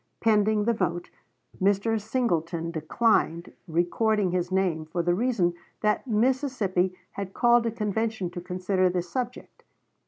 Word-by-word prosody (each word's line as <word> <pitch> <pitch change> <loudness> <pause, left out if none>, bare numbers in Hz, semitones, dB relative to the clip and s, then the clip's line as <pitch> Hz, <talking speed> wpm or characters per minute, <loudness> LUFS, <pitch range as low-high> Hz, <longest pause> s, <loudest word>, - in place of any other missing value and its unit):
Pending 215 -1 +3
the 235 - +3
vote, 175 -4 -2 0.5
Mr. 205 +3 +2
Singleton 170 -8 -1
declined 170 +1 +1
recording 185 +4 +1
his 180 0 -1
name 185 -4 +1
for 170 +2 -2
the 175 +1 +2
reason 205 -4 +1 0.3
that 210 +4 +1
Mississippi 220 -6 +1
had 195 -1 -6
called 240 -1 +4
a - - 0
convention 220 -3 -2
to 175 -1 -6
consider 185 +1 0
this 180 -1 -2
subject. 250 -1 -5
195 Hz, 130 wpm, -26 LUFS, 175-225 Hz, 0.5 s, called